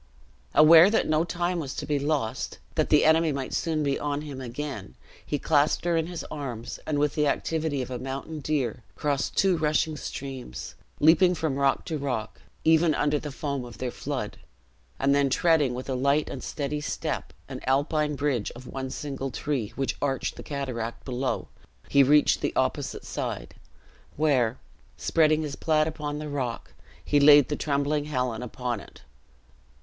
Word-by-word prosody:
Aware 160 +4 +9
that 220 - +1
no 155 +1 +2
time 175 +1 -1
was 140 -3 -5
to - - -4
be 145 -1 0
lost, 140 -6 -2 0.2
that - - 0
the - - +5
enemy 160 0 +4
might 135 -2 -4
soon 155 -2 0
be 140 -1 0
on 145 0 -2
him 140 -3 -7
again, 125 - -6 0.3
he 145 - -2
clasped 150 +3 +2
her 170 -1 +2
in 165 0 +1
his 175 -2 -5
arms, 125 -6 -5
and 155 -2 0
with 145 0 +1
the 150 -1 +1
activity 155 -1 -1
of 125 - -8
a 125 - -3
mountain 135 +4 -5
deer, 135 -6 -1
crossed 145 -2 -1
two 190 -3 +4
rushing 155 0 +1
streams; 130 - -6 0.3
leaping 175 +4 +5
from 155 -4 -1
rock 140 0 +1
to 155 -2 -3
rock, 125 -6 -3 0.2
even 160 -1 +4
under 145 0 +1
the 150 0 -6
foam 140 -2 -3
of 120 -1 -10
their 125 -1 -3
flood; - - -4 0.6
and 140 +1 +2
then 140 -1 +3
treading 150 -3 +3
with 130 - -6
a 135 - -1
light 140 +4 +1
and - - -6
steady 150 0 -3
step, - - -3 0.2
an - - -6
alpine 150 +2 +1
bridge 135 -6 0
of 125 +2 -11
one 130 +1 -5
single 135 0 -4
tree, 130 -4 -2
which 135 -1 -2
arched 135 -2 -1
the - - -8
cataract 125 -5 -4
below, 130 0 -2 0.4
he 140 - +5
reached 145 +2 +4
the - - -1
opposite - - -1
side, - - -4 0.6
where, 130 -6 +2 0.4
spreading 155 -1 +3
his 145 -2 -4
plaid 155 -1 +2
upon 150 -2 -4
the 150 0 -5
rock, 130 -5 -4 0.3
he 145 - +3
laid 145 -1 +7
the 145 - 0
trembling 145 0 0
Helen 125 -5 -2
upon 125 -1 -3
it. - - -15
145 Hz, 175 wpm, -27 LUFS, 130-155 Hz, 0.6 s, Aware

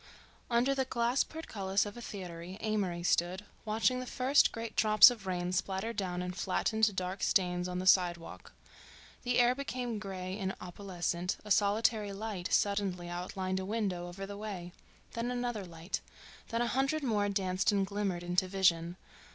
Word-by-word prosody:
Under 245 +3 +3
the 270 -1 +1
glass 240 +1 +1
portcullis 200 -12 -2
of 205 - -7
a 240 - -8
theatre 180 -7 -7 0.2
Amory 195 -6 -1
stood, 180 +3 +1 0.2
watching 225 +4 +2
the 255 - -5
first 265 +4 +3
great 230 0 -6
drops 215 +3 +8
of 220 -5 -8
rain 180 -1 -1
splatter 190 +4 -1
down 180 -4 -2
and 180 0 -4
flatten 220 +4 -1
to 220 -1 +6
dark 185 0 -3
stains 180 -2 +2
on 180 0 -3
the 185 - -3
sidewalk. 175 -3 +2 0.7
The 245 0 0
air 245 0 +5
became 250 -4 -3
gray 190 -1 -5
and 190 -1 -2
opalescent; 180 -1 -3
a 210 - -6
solitary 210 0 +2
light 200 -3 -4
suddenly 195 -4 +1
outlined 185 +2 -3
a - - -3
window 190 -4 -2
over 190 +3 -6
the 200 +1 -7
way; 190 -5 -6 0.4
then 235 +1 -2
another 245 -4 -2
light; 170 +1 -5 0.5
then 230 +1 0
a - - 0
hundred 275 +5 0
more 210 -5 +1
danced 190 -1 +1
and 200 -1 +2
glimmered 195 -3 -2
into 180 +2 +1
vision. 175 -2 +2
195 Hz, 165 wpm, -32 LUFS, 180-225 Hz, 0.7 s, drops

